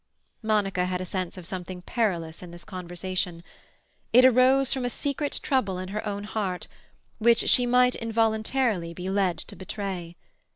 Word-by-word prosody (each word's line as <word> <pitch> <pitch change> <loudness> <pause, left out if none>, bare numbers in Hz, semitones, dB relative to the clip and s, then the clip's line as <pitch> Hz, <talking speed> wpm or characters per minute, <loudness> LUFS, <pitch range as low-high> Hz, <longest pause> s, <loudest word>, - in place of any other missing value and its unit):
Monica 205 -4 +1
had 180 0 -1
a 185 - -3
sense 185 0 -3
of 180 - -8
something 180 0 -6
perilous 175 -10 -1
in 180 - -9
this 170 -2 -12
conversation. 180 -1 -4 0.7
It 250 +2 +7
arose 260 +1 +5
from 265 - -2
a 245 - 0
secret 285 +4 -2
trouble 215 -10 +1
in 185 0 -5
her 210 +2 -3
own 205 0 -3
heart, 200 -4 -3 0.5
which 230 +1 +4
she 245 -1 +5
might, 250 +1 +4
involuntarily, 220 -4 0
be 185 +2 -4
led 195 -3 +1
to - - -9
betray. 190 -3 -5
195 Hz, 160 wpm, -26 LUFS, 180-235 Hz, 0.7 s, It